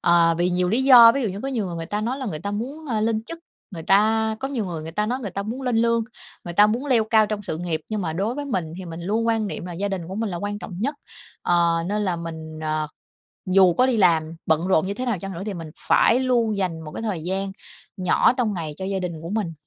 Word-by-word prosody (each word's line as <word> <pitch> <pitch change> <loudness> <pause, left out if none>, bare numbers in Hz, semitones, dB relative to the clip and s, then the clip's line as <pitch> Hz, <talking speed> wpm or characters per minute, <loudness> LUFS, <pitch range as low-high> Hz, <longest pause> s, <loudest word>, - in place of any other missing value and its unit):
ờ, 170 -1 +4
vì 175 +1 +2
nhiều 180 0 +1
lý 230 +6 +2
do. 235 -4 +9
Ví 275 - -1
dụ 225 - 0
như 195 +2 -5
có 270 - -3
nhiều 235 -7 -2
người 175 -2 -5
người 165 0 -5
ta 205 +3 -2
nói 245 +5 -2
là 260 - -4
người 155 -8 -3
ta 200 +6 -4
muốn, 270 +10 -5
a, 220 - 0
lên 220 0 0
chức, 335 - -8 0.3
người 170 -5 -7
ta 220 +4 +3
có 270 - -2
nhiều 255 -6 -2
người 165 -3 -5
người 160 +1 -7
ta 210 +4 0
nói 250 +3 -2
người 205 -6 -5
ta 200 +3 -3
muốn 235 +6 -5
lên 250 -3 0
lương, 230 0 +2 0.4
người 175 - -6
ta 205 +3 +7
muốn 235 +7 -1
leo 240 -5 +3
cao 220 -1 +4
trong 210 0 -4
sự 160 -5 -4
nghiệp. 170 -3 -2
Nhưng 215 -1 -2
mà 160 -2 -2
đối 200 +8 -1
với 290 - -4
mình 180 - -3
thì 185 - -7
mình 165 0 -7
luôn 215 +6 -1
quan 225 -2 +1
niệm 195 - -5
là 180 - -6
gia 195 +4 -2
đình 180 -4 -4
của 190 - -6
mình 220 +1 -2
là 175 - -4
quan 205 +3 -4
trọng 180 -3 -8
nhất, 280 +6 -1 0.5
ờ, 170 -1 +2
nên 210 +1 0
là 180 -3 0
mình, 160 -2 -7
ờ, 155 0 -1 0.7
dù 185 -2 +6
có 250 - +3
đi 250 - +2
làm 165 -4 +3
bận 160 +3 +1
rộn 185 -3 +3
như 200 - -2
thế 255 +4 -4
nào 235 -5 0
chăng 195 +2 -6
nữa 170 - -6
thì 210 - -3
mình 165 -3 -7 0.2
phải 235 - +5
luôn 240 -5 +1
dành 175 -4 -2
một 155 - -8
cái - - -6
thời 205 -8 -3
gian 195 +2 -2 0.5
nhỏ 185 +6 +3
trong 225 -4 +1
ngày 160 -5 -4
cho 190 - -5
gia 195 0 -2
đình 170 -3 -5
của 165 - -7
mình. 200 -5 -2
200 Hz, 285 wpm, -23 LUFS, 170-225 Hz, 0.7 s, do